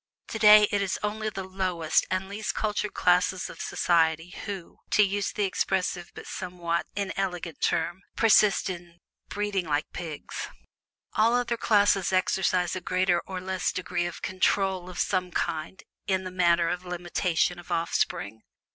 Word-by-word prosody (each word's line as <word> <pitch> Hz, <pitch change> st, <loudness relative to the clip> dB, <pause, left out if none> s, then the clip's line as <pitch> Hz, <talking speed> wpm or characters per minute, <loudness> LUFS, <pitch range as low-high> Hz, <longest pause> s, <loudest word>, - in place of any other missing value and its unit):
Today 210 Hz, -1 st, +7 dB
it 205 Hz, -, +1 dB
is 195 Hz, -2 st, -1 dB
only 215 Hz, +1 st, -1 dB
the 195 Hz, -2 st, -5 dB
lowest 185 Hz, -4 st, 0 dB
and 185 Hz, +1 st, -1 dB
least 205 Hz, +2 st, -4 dB
cultured 210 Hz, -1 st, -1 dB
classes 180 Hz, +1 st, +2 dB
of -, -, -10 dB
society 165 Hz, 0 st, +1 dB
who 195 Hz, -5 st, -7 dB
(to 210 Hz, -, +5 dB
use 200 Hz, 0 st, 0 dB
the 210 Hz, -, -1 dB
expressive 185 Hz, -2 st, -1 dB
but -, -, -9 dB
somewhat 175 Hz, -2 st, -3 dB
inelegant 185 Hz, -4 st, -3 dB
term) 175 Hz, +2 st, 0 dB
persist 215 Hz, -2 st, +4 dB
in 175 Hz, -2 st, -7 dB, 0.3 s
"breeding 205 Hz, -4 st, -2 dB
like 150 Hz, 0 st, -1 dB
pigs." 160 Hz, -4 st, -6 dB, 0.7 s
All 225 Hz, +2 st, +3 dB
other 245 Hz, -1 st, +1 dB
classes 205 Hz, -4 st, +3 dB
exercise 185 Hz, -1 st, +1 dB
a 185 Hz, -, -4 dB
greater 185 Hz, -1 st, +1 dB
or 190 Hz, -1 st, -4 dB
less 185 Hz, 0 st, -1 dB
degree 175 Hz, -1 st, -2 dB
of 175 Hz, -, -8 dB
"control" 185 Hz, -1 st, 0 dB
of 180 Hz, -, -9 dB
some 185 Hz, -2 st, 0 dB
kind 160 Hz, +1 st, -3 dB, 0.2 s
in 190 Hz, -1 st, +1 dB
the 185 Hz, -, -6 dB
matter 170 Hz, -2 st, +3 dB
of 180 Hz, +1 st, -2 dB
limitation 175 Hz, 0 st, -1 dB
of 175 Hz, -, -12 dB
offspring. 110 Hz, -, -1 dB
185 Hz, 150 wpm, -27 LUFS, 175-200 Hz, 0.7 s, Today